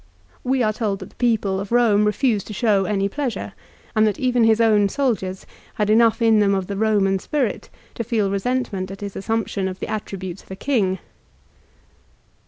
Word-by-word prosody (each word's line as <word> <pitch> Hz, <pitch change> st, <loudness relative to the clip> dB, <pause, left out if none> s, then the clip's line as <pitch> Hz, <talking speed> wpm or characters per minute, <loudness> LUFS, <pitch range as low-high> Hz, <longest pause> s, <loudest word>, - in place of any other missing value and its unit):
We 260 Hz, 0 st, +1 dB
are 215 Hz, -1 st, +1 dB
told 210 Hz, -3 st, -1 dB
that -, -, -10 dB
the -, -, -25 dB
people 215 Hz, -5 st, +1 dB
of 200 Hz, 0 st, -5 dB
Eome 220 Hz, -3 st, +3 dB
refused 210 Hz, -1 st, 0 dB
to 215 Hz, -, -6 dB
show 205 Hz, -2 st, +2 dB
any 200 Hz, -1 st, 0 dB
pleasure, 255 Hz, +2 st, -4 dB, 0.4 s
and 215 Hz, 0 st, +4 dB
that 205 Hz, -, -1 dB
even 250 Hz, -2 st, +2 dB
his 225 Hz, 0 st, +4 dB
own 210 Hz, -3 st, +4 dB
soldiers 205 Hz, -8 st, -2 dB, 0.3 s
had 210 Hz, 0 st, +1 dB
enough 225 Hz, +1 st, +4 dB
in 225 Hz, -1 st, +5 dB
them 200 Hz, -1 st, +3 dB
of 190 Hz, -1 st, -1 dB
the 200 Hz, -, -5 dB
Eoinan 200 Hz, -2 st, +1 dB
spirit 275 Hz, -8 st, -2 dB, 0.2 s
to 230 Hz, -, -4 dB
feel 215 Hz, -4 st, 0 dB
resentment 200 Hz, -2 st, -2 dB
at 195 Hz, +1 st, -9 dB
his 200 Hz, -1 st, -6 dB
assumption 210 Hz, -2 st, -2 dB
of 185 Hz, 0 st, -6 dB
the -, -, -3 dB
attributes 190 Hz, -3 st, -5 dB
of -, -, -24 dB
a 190 Hz, -, -6 dB
king. 195 Hz, -5 st, 0 dB
210 Hz, 190 wpm, -22 LUFS, 195-230 Hz, 0.4 s, in